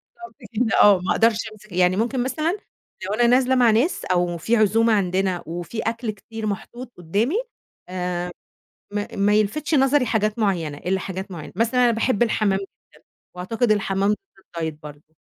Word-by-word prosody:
بالضبط 350 0 -12 0.2
كده 225 0 +2
آه، 200 -3 +7
ما 180 - -2
أقدَرش 225 -1 +3 0.2
أمسِك 210 -1 -17
يعني 180 +1 +3
ممكن 240 +3 0
مثلًا 310 +9 -1 0.5
لو 200 - -2
أنا 240 +2 +3
نازلة 255 +1 +4
مع 245 -3 +5
ناس 245 +11 +1
أو 175 -1 0
فيه 220 +9 +1
عزومة 220 +2 +3
عندنا 185 -2 0
وفيه 175 +7 -5
أكْل 230 0 -2
كتير 220 +2 -8
محطوط 235 +4 -5
قُدّامي 200 - 0 0.5
آآ 180 -1 -3 0.6
ما 205 0 -2
ما 200 +1 +2
يلفِتش 280 +10 +1
نظري 270 0 +3
حاجات 215 -1 0
معيّنة، 170 -9 0
إلّا 190 +5 -1
حاجات 190 +1 -6
معينة، 165 -4 -8
مثلًا 235 +4 +2
أنا 240 - +4
باحب 230 0 +1
الحمام 210 -4 +1
جدًا 195 - -7 0.7
وأعتقد 215 +6 -1
الحمام 195 -1 +1
ضد 210 - +1 0.5
الdiet 160 -1 -2
برضه. 150 +1 -13
210 Hz, 170 wpm, -22 LUFS, 185-235 Hz, 0.7 s, آه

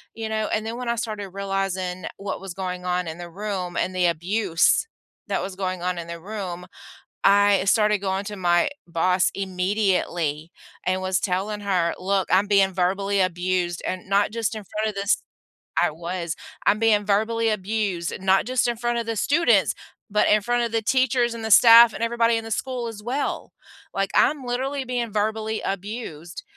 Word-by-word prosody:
You 225 -1 -4
know, 215 0 -1
and 215 0 -1
then 230 +2 -4
when 250 -1 -4
I 235 - +1
started 215 -4 -4
realizing 195 -2 -3
what 200 -1 -5
was 195 -3 -7
going 180 -1 -5
on 180 -1 -1
in 160 +1 -6
the 175 0 -7
room 190 -2 -4
and 185 - -1
the 180 -1 +2
abuse 175 - +1 0.4
that - - -1
was 190 -1 -6
going 185 -2 -3
on 180 -1 -1
in 170 - -7
the 170 0 -7
room, 185 -3 -6 0.6
I 200 -1 +5
started 210 +1 +3
going 195 0 -2
to 210 -1 -5
my 175 +5 +2 0.2
boss 180 +2 +2
immediately 180 -5 -1 0.3
and 185 +1 0
was 185 0 0
telling 200 +3 -2
her, 180 -4 +1
"Look, 190 +1 0
I'm 195 +2 +4
being 195 -2 +3
verbally 195 +2 0
abused 180 -1 0
and 185 0 -4
not 200 +1 +2
just 230 -1 -1
in 215 - -7
front 215 +3 -2
of 210 - -4
this" 200 +1 0 0.6
I - - +3
was. 170 +1 -4 0.3
"I'm 210 - +4
being 210 -2 +3
verbally 225 +3 +1
abused, 200 -4 -2
not 190 0 +3
just 255 0 +1
in 235 - -1
front 240 0 -1
of 230 - -3
the 225 -1 -2
students, 330 - +3 0.4
but 210 - +2
in 210 0 +4
front 240 +2 +1
of 235 - -2
the 225 -1 0
teachers 245 -1 +2
and 225 -1 -7
the 220 - -3
staff 230 +1 +9
and - - -5
everybody 230 0 +2
in 225 - -3
the 225 - -8
school 250 -1 -3
as 210 -2 -8
well," 260 +5 -3 0.4
like 195 0 -1
I'm 285 -3 +3
literally 265 +3 -2
being 240 -3 -3
verbally 220 +1 -1
abused 195 -4 -5
200 Hz, 185 wpm, -24 LUFS, 185-225 Hz, 0.6 s, staff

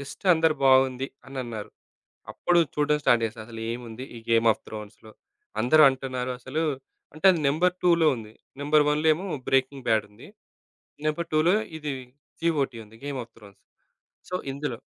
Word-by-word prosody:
Just 140 +6 -10
అందరూ 160 -1 +2
బావుంది 130 0 +4 0.2
అనన్నారు. 120 -6 -6 0.6
అప్పుడు 175 -1 +2 0.2
చూడడం 150 0 +2
స్టార్ట్ 120 -1 +4
జేశా 110 0 -6
అసలు 115 -1 -9
ఏముంది? 120 0 -7
ఈ - - -7
'గేమ్ 115 0 +4
ఆఫ్ - - -5
త్రోన్స్‌లో?' 110 0 -10 0.5
అందరూ 155 +7 +5
అంటున్నారు 130 -1 -3
అసలు 135 +6 -3 0.5
అంటే, 155 +5 -5
అది 175 - -1
నెంబర్ 175 +6 +2
2లో 170 -2 +4
ఉంది. 110 -2 -10 0.3
నంబర్ 150 +1 +4
1లో 150 +2 +1
ఏమో 175 +6 -6 0.2
'బ్రేకింగ్ 135 0 +1
బ్యాడ్' 110 -2 +2
ఉంది. 105 +3 -14 0.8
నంబర్ 160 +2 -1
2లో 155 +4 +4 0.2
ఇది, 150 -2 -4 0.5
జీఓటీ 145 -8 0
ఉంది, 110 +2 -17
'గేమ్ 140 -2 -4
ఆఫ్ 115 - -28
త్రోన్స్.' 100 -3 -16 0.7
సో, 180 - -2 0.2
ఇందులో 140 -3 -4
135 Hz, 155 wpm, -26 LUFS, 115-155 Hz, 0.8 s, అందరూ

